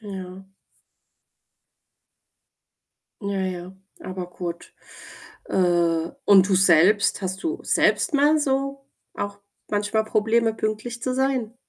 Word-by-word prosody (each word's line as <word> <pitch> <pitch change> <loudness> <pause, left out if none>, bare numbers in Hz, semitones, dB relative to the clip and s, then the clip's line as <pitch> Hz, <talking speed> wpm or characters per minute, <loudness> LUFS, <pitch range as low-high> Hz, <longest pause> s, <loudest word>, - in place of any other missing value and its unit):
Ja. 190 -2 -8 2.8
Ja, 200 -1 -2
ja, 185 -1 -4 0.3
aber 185 -1 -6
gut. 175 -1 -7 0.7
Äh, 170 -3 +1
und 195 -4 +6
du 195 - +2
selbst? 190 +3 +4
Hast 190 0 -4
du 335 +2 -2
selbst - - +2
mal 295 +2 +4
so, 275 -1 -1 0.3
auch 205 0 -5 0.3
manchmal 210 +1 0
Probleme, 220 +1 +1
pünktlich 220 +2 -4
zu 255 - -1
sein? 260 -4 -1
205 Hz, 105 wpm, -23 LUFS, 185-235 Hz, 2.8 s, und